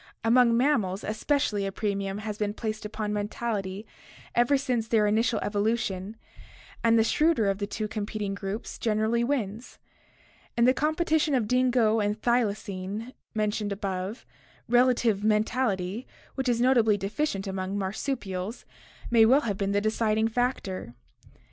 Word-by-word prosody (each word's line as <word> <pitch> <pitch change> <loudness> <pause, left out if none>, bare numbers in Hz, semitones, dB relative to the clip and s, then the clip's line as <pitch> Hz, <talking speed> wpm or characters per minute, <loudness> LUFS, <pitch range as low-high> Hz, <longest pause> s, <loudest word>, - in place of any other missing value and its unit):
Among 235 0 +5
mammals 220 -8 +1
especially 215 -1 0
a 195 - -2
premium 200 -1 -2
has 210 0 -4
been 210 -1 -1
placed 215 -1 -4
upon 210 -1 -3
mentality 205 -1 -3 0.5
ever 240 +4 +3
since 245 -4 -1
their 220 -2 +3
initial 220 +3 +2
evolution, 205 -1 -1 0.7
and 230 0 +5
the 225 - +5
shrewder 300 -1 +2
of 195 0 0
two 215 +1 -3
competing 210 -1 -3
groups 200 +3 -5
generally 220 +1 +1
wins. 235 -4 -3 0.8
In 235 - +5
the 255 - +5
competition 310 0 +1
of 230 -5 +1
dingo 245 -3 +3
and 210 +1 0
thylacine 215 -1 -1 0.2
mentioned 210 -1 -1
above, 195 +2 -4 0.4
relative 240 -4 +3
mentality, 215 -1 0 0.3
which 265 -2 -1
is 235 -1 +1
notably 235 -4 +4
deficient 200 +1 -2
among 190 0 -3
marsupials, 200 0 -3 0.5
may 230 -2 +6
well 260 +6 +5
have 210 -7 -2
been 195 0 -1
the 205 0 +2
deciding 220 0 +1
factor. 220 - -2
215 Hz, 135 wpm, -27 LUFS, 205-240 Hz, 0.8 s, may